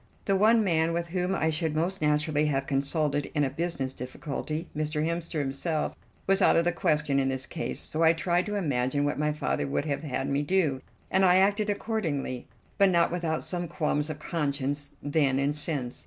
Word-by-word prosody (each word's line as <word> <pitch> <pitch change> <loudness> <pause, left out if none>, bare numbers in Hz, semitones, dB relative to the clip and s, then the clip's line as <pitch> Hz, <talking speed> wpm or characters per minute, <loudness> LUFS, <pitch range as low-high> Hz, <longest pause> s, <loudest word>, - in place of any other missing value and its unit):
The 195 - +2
one 220 +3 +5
man 165 -3 +2
with 170 0 -2
whom 180 +1 0
I 160 -3 +1
should 160 0 -1
most 180 +5 -1
naturally 150 0 +2
have 135 -2 0
consulted 145 +1 0
in 145 - +3
a 135 - 0
business 145 -4 -2
difficulty 150 +5 -5
Mr. 155 0 -1
Hemster 170 0 -2
himself 150 +3 -1 0.3
was 195 +1 +3
out - - +5
of 165 - +3
the 175 - +3
question 150 -4 +1
in 135 - +1
this 130 0 -2
case, 165 - -3
so 155 - -1
I 165 0 +6
tried 175 +2 0
to 210 - -2
imagine 145 -5 0
what 145 0 -1
my 150 0 +1
father 150 - -1
would 140 +1 -1
have 145 -2 -2
had 135 -3 -3
me 140 +1 +1
do, 150 -5 +1 0.3
and 190 - +3
I 180 -1 +6
acted 205 +3 +3
accordingly, 170 - -2 0.3
but 200 -1 +6
not 170 -2 +3
without 170 -3 -1
some 175 -1 -3
qualms 150 -1 -1
of 155 - -4
conscience 145 -3 -2
then 145 -2 +2
and 140 +2 +1
since. 145 -5 -1
155 Hz, 200 wpm, -28 LUFS, 145-175 Hz, 0.3 s, I